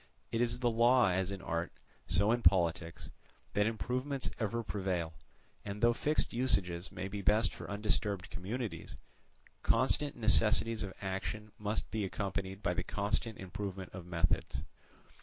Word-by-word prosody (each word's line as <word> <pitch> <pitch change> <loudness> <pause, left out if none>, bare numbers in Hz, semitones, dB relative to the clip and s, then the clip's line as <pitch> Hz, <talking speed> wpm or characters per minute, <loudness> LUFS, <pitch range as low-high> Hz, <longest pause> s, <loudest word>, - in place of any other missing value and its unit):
It 115 - +1
is 120 +1 +1
the 120 -1 +3
law 120 0 +5
as 95 +1 0
in 100 -2 -6
art, 85 +1 -2 0.4
so 100 +3 +4
in 120 0 +2
politics, 85 -4 +2 0.4
that 105 +1 +3
improvements 125 +4 -1
ever 115 +1 -1
prevail; 95 -6 -2 0.5
and 100 0 -5
though 120 +1 +5
fixed 150 +6 +1
usages 100 -8 0
may 90 +1 -4
be 100 +1 -5
best 105 +2 +3
for - - -8
undisturbed 100 -2 -1
communities, 95 -3 -4 0.6
constant 135 +4 +2
necessities 110 0 +4
of 100 -2 -4
action 100 +3 -3
must 105 +1 -2
be 110 -2 -1
accompanied 95 0 -3
by 90 -1 +1
the 90 0 -1
constant 105 +3 -1
improvement 95 0 -5
of 90 -2 -8
methods. 85 -5 0
100 Hz, 145 wpm, -33 LUFS, 95-115 Hz, 0.6 s, law